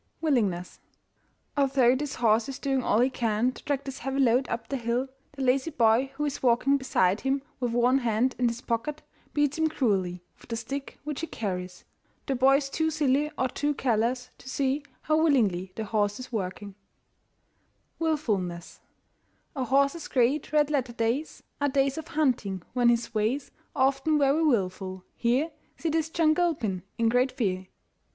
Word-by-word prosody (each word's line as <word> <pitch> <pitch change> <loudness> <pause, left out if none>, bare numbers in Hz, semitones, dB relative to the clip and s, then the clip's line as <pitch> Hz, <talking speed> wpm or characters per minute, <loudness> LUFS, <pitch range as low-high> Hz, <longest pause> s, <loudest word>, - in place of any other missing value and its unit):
WILLINGNESS. 210 - 0 0.8
Although 265 -3 +4
this 290 +1 -3
horse 225 0 +2
is 270 - -5
doing 270 -1 0
all 225 -1 +2
he 255 - +4
can 230 0 +1
to - - -13
drag 280 -1 -2
his 270 0 -6
heavy 270 0 -2
load 255 0 +3
up 230 0 -3
the 275 - -2
hill, 245 +2 -1 0.2
the 275 -2 -4
lazy 260 +4 +2
boy 240 -2 +3
who 295 +1 -1
is 285 -1 -3
walking 255 +3 +3
beside 205 -8 +1
him, 270 0 0 0.2
with 245 -2 -1
one 245 +3 +3
hand 240 +1 +1
in 245 - +3
his 235 +1 -3
pocket, 270 +7 -3 0.3
beats 295 +1 +1
him 320 - +3
cruelly 190 - 0 0.2
with - - -18
the 230 - -2
stick 275 +4 -5
which 300 -1 -4
he 330 - -3
carries. 180 - -5 0.4
The 275 - 0
boy 265 +2 +5
is 275 -1 -1
too 320 0 +1
silly 295 -1 +1
or 260 - +1
too 290 +3 -1
careless 245 +1 0
to 260 - -11
see 275 +2 0 0.2
how 310 +1 +2
willingly 205 - +2
the 220 - -3
horse 205 0 0
is 255 - -8
working. 200 -1 -4 1.3
WILFULNESS. 210 - -2 0.8
A 260 -2 -1
horse's 280 +5 +2
great 265 +4 +1
red 300 -1 +3
letter 260 -5 0
days 235 +6 -2 0.2
Are 285 - +3
days 275 +2 +1
of 320 - -8
hunting, 240 - 0
when 245 -2 +4
his 235 0 0
ways 220 +6 -1 0.2
Are 265 -1 +5
often 275 +3 0
very 285 +2 +3
wilful. 190 - 0
Here 255 +7 +1 0.3
See 330 - -2
this 320 0 0
John 320 -1 +3
Gilpin 280 - 0 0.2
in 230 - +2
great 250 +3 +3
fear. 190 -7 -1
260 Hz, 175 wpm, -27 LUFS, 225-280 Hz, 1.3 s, boy